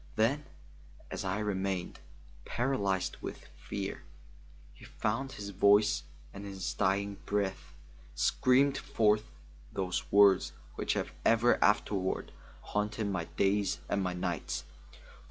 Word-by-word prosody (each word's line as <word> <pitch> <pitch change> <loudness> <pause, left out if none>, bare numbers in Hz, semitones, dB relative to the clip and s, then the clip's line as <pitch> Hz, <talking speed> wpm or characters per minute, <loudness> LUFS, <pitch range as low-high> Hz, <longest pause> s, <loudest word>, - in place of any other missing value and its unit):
Then, 135 +7 +2 0.7
as - - -3
I 95 +1 -1
remained, 95 -3 -2 0.4
paralyzed 100 -7 0
with - - -7
fear, - - -5 0.7
he - - -17
found 130 +6 -2
his 100 -1 -6
voice 100 -4 +4 0.3
and 100 - -8
in 100 -1 -6
his 95 -1 -3
dying 100 0 0
breath 95 -8 -2 0.4
screamed 135 - +3
forth 105 -1 +2 0.5
those 95 -2 -2
words 100 -2 +6 0.2
which - - -1
have - - -2
ever 115 +2 +4
afterward 100 -2 +1 0.3
haunted 105 0 -2
my 90 -4 -2
days 100 -6 +2
and 100 - +1
my 90 -1 -1
nights. 90 -6 -3
100 Hz, 120 wpm, -31 LUFS, 95-105 Hz, 0.7 s, words